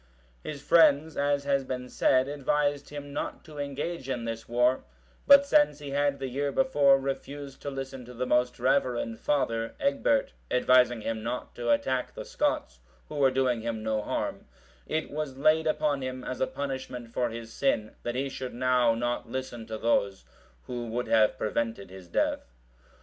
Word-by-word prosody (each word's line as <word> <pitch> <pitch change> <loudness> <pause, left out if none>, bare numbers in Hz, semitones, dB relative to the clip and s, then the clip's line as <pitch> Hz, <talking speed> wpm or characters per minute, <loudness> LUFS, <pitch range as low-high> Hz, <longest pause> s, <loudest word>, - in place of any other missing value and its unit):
(724) - - -5
His 145 -2 -9
friends, 160 -1 +5
as 140 0 +1
has 140 -1 +1
been 125 -1 -5
said, 130 +1 +2
advised 145 0 0
him 145 -1 -8
not 145 - -4
to 155 -3 -10
engage 145 +1 -4
in 120 -3 -2
this 115 0 -5
war; 125 +2 +2 0.4
but 280 0 +9
since 295 - +4
he 145 -2 -7
had 140 0 +1
the 135 - -4
year 140 +3 -1
before 145 - +4
refused 140 0 -5
to 145 - -4
listen 135 -1 -6
to 125 - -11
the 125 +2 -2
most 125 0 +1
reverend 125 -3 +1
father, 115 -6 0
Egbert,(725) 280 0 +1 0.3
advising 125 -2 +4
him 110 0 -3
not 120 +3 -4
to 120 0 -4
attack 130 -10 +1
the - - -6
Scots, - - -1 0.3
who - - -7
were 135 -2 +5
doing 130 -3 +1
him 110 -1 -3
no 110 -1 0
harm, - - -3 0.4
it 160 - -2
was 145 -3 -4
laid 155 +3 +3
upon 150 -2 +1
him 130 0 -5
as 130 - -5
a 130 - +2
punishment 130 -4 -5
for 120 -1 0
his 115 0 -8
sin, 110 -6 0
that 120 0 -3
he 135 +2 -1
should 130 -2 -6
now 125 -2 +3
not 120 +1 -2
listen 125 -4 -5
to 110 -1 -4
those 100 - +1 0.4
who 120 -1 -5
would 120 +2 -2
have 110 -1 +4
prevented 110 -3 -2
his 95 -2 -11
death. 75 -6 -1
130 Hz, 180 wpm, -28 LUFS, 120-145 Hz, 0.4 s, but